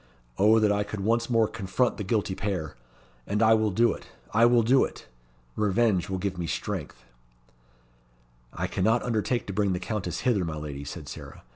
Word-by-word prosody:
Oh, 105 +3 +6
that 105 -2 +3
I 105 0 +1
could 105 0 -4
once 115 +4 +1
more 115 -2 +3
confront 115 +4 -1
the 105 - -3
guilty 100 -1 0
pair! 90 -7 -3 0.5
And 105 +2 +1
I 110 0 +6
will 110 -1 +2
do 115 +4 +3
it - - -11 0.3
I 115 +3 +6
will 120 -1 +4
do 130 +4 +4
it! - - -6 0.5
Revenge 105 -3 +1
will 95 - -1
give 95 -1 -3
me 85 - -2
strength." - - -4 1.5
"I - - -3
cannot 110 +5 +1
undertake 120 +1 -1
to 100 - -5
bring 100 -1 +1
the 90 - -2
Countess 100 -1 -3
hither, 120 -6 +2
my 80 -2 -4
lady," 70 -2 -6
said 70 - -7
Sarah. - - -10
105 Hz, 185 wpm, -27 LUFS, 95-115 Hz, 1.5 s, Oh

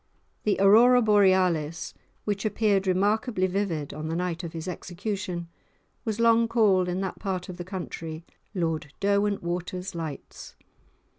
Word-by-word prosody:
The 210 - +2
aurora 230 +6 +7
borealis, 185 -7 +2 0.3
which 205 -2 -1
appeared 205 -3 +1
remarkably 205 +2 +1
vivid 180 -6 -2
on 155 +1 -5
the 165 - -2
night 180 0 -2
of 170 -1 -6
his 165 +1 -6
execution, 180 0 -4 0.6
was 220 -1 -2
long 230 0 +4
called 205 -6 +3
in 180 +2 -2
that 190 - -4
part 185 -3 -3
of 180 - -7
the 175 - -5
country 165 -3 -6 0.3
"Lord 165 -5 -2
Derwentwater's 190 -2 -1
Lights." 160 -4 -7
185 Hz, 135 wpm, -26 LUFS, 170-205 Hz, 0.6 s, aurora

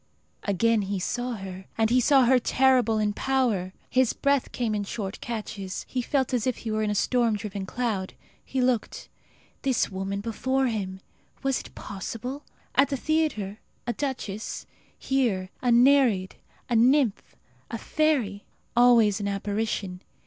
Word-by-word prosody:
Again 220 +3 +2
he 200 0 -2
saw 245 +6 -2
her, 190 -3 -7
and 230 +3 +3
saw 270 -1 +5
her 255 +1 +5
terrible 250 -3 +3
in 210 -1 +1
power. 235 -8 0 0.2
His 255 -2 +2
breath 280 -2 +1
came 235 -3 -1
in 205 -1 -1
short 200 -1 -5
catches. 210 -5 -5
He 255 - -2
felt 265 +1 0
as 245 0 +1
if 255 - 0
he 225 - -5
were 215 0 0
in 215 - 0
a 210 - 0
storm 235 0 +2
driven 205 -2 -5
cloud. 210 -5 -2 0.3
He 265 - -2
looked. 250 -2 -1 0.5
This 260 -6 +1
woman 195 +1 -3
before 260 +5 0
him! 195 -5 -3 0.4
Was 270 -1 +1
it - - -12
possible? 230 +7 -6 0.3
At 275 +2 +4
the 275 - -1
theatre 260 -10 -1 0.3
a 240 - -1
duchess; 230 -6 -4 0.3
here 220 -9 0
a 245 - +2
nereid, 240 -6 +4 0.3
a 240 - 0
nymph, 245 -1 +3 0.3
a 230 - -3
fairy. 250 -8 0 0.3
Always 235 -4 +5
an 200 - -2
apparition. 200 -2 -2
230 Hz, 150 wpm, -26 LUFS, 200-255 Hz, 0.5 s, saw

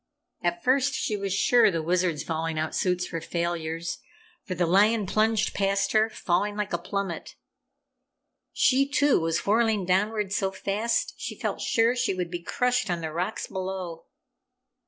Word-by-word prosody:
At 345 0 -1
first 265 +1 +2
she 215 - -1
was 200 -1 -3
sure 235 +5 +4
the 165 -4 -2
Wizard's 175 -2 0
falling 165 0 -2
out 155 0 -2
suits 180 -1 0
were 165 -2 -3
failures, 170 -1 -3 0.4
for 185 - -5
the 175 0 +1
lion 205 +5 +3
plunged 215 +2 +1
past 195 0 +1
her, 220 0 +3
falling 205 0 -1
like 210 -2 -3
a 175 - 0
plummet. 190 -1 -4 1.2
She, 275 +1 +3
too, 285 -1 +3
was 165 -1 -1
whirling 220 -2 +2
downward 200 +2 +1
so 205 -4 +1
fast 200 +4 -1
she - - -5
felt - - -3
sure 230 +2 +2
she 240 -6 0
would 180 -2 -3
be 175 -1 -4
crushed 250 +4 0
on 175 -1 -1
the 160 -1 -4
rocks 180 +6 -2
below. 185 -3 -5
195 Hz, 160 wpm, -26 LUFS, 175-220 Hz, 1.2 s, sure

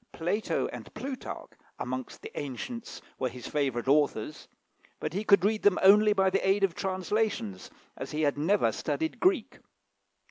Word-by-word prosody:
Plato 190 +7 -1
and - - -9
Plutarch, 265 -1 -6 0.3
amongst 130 0 -5
the - - -7
ancients, 185 - -6 0.2
were 130 - 0
his 125 -2 -10
favourite 135 -5 -1
authors; 145 -1 +1 0.5
but - - -3
he 200 +3 -1
could 200 -3 +5
read 215 +1 +1
them 205 -3 +4
only 210 +2 +7
by 195 -2 +3
the 195 - +1
aid 195 +1 +3
of 190 -3 +3
translations, 185 - -2 0.3
as - - -6
he 155 +1 -2
had 145 -1 +2
never 165 +8 +2
studied 320 0 -2
Greek. 360 - +1
190 Hz, 155 wpm, -29 LUFS, 145-210 Hz, 0.5 s, only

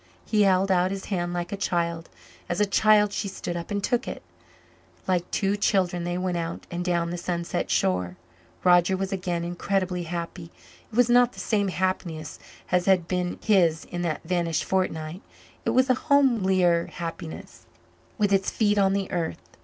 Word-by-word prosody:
He 215 -1 +2
held 195 -1 +3
out 180 0 +3
his 195 0 -5
hand 175 -1 -1
like 175 0 -3
a - - -1
child; 170 -3 -2 0.4
as 175 - -1
a 210 - +4
child 210 0 +4
she 200 - -2
stood 185 -2 -5
up 170 -1 -5
and 200 -1 -2
took 245 +2 0
it; - - -6 0.8
like 180 -2 0
two 200 0 0
children 185 -4 +1
they 175 0 -2
went 180 -1 -1
out 165 0 -4
and 175 0 -3
down 170 -1 0
the 175 - -4
sunset 175 0 -2
shore. 90 -1 0 0.5
Roger 180 +1 +4
was 195 0 -3
again 180 -3 -2
incredibly 180 +1 -1
happy. 170 0 -5 0.4
It - - -10
was 245 0 +5
not 245 0 +4
the - - -11
same 205 -3 0
happiness 175 -4 -2 0.3
as 180 0 +2
had 185 -3 +3
been 180 -1 -2
his 175 -7 +3
in 175 - -3
that 170 -3 -2
vanished 170 -2 0
fortnight; 175 -2 -2 0.4
it - - +1
was 255 +1 +3
a 255 - +4 0.2
homelier 190 -11 +3
happiness 165 -1 -8 0.5
with 205 -3 +2
its 195 -1 +2
feet 205 -2 +1
on 195 -1 +3
the 195 -1 -2
earth. 165 - -4
180 Hz, 175 wpm, -26 LUFS, 170-195 Hz, 0.8 s, was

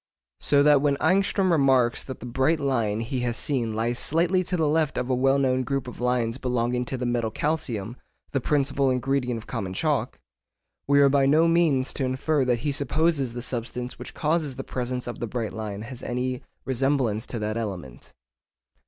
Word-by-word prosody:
So 140 -1 +3
that 145 -2 +5
when 140 -1 +2
Ångström 195 +2 +2
remarks 135 -6 +3
that 130 - -7
the - - -7
bright 130 +6 +1
line 115 -6 0
he 125 +3 -3
has 120 -1 -1
seen 120 -6 -1
lies 120 +2 -1
slightly 175 +4 +2
to 180 0 -1
the 160 -2 +2
left 155 -1 +1
of 125 +1 -1
a - - +3
well 135 +2 +3
known 130 -2 +2
group 135 -1 -2
of 125 - -8
lines 125 -1 0
belonging 125 -1 0
to 130 - -4
the 125 - -3
metal 120 -2 0
calcium 120 -6 -2 0.4
(the 135 - 0
principal 140 0 +1
ingredient 125 -1 0
of 110 - -9
common 100 -7 -4
chalk), - - 0 0.7
we 140 0 +5
are 140 - +7
by 135 -1 +3
no 155 +4 +5
means 160 -6 +2
to 135 - -2
infer 130 +3 +1
that 120 -2 +1
he 145 - +2
supposes 140 -1 +1
the 120 0 -5
substance 125 0 -4
which - - -9
causes 155 -3 0
the 135 - -5
presence 125 -1 -3
of 120 - -6
the 120 - -3
bright 115 -2 -3
line 105 -2 -5
has 125 +1 -9
any 125 +1 -2 0.2
resemblance 130 -4 0
to 120 - -5
that 110 0 -2
element. 95 - -6
130 Hz, 195 wpm, -25 LUFS, 120-140 Hz, 0.7 s, are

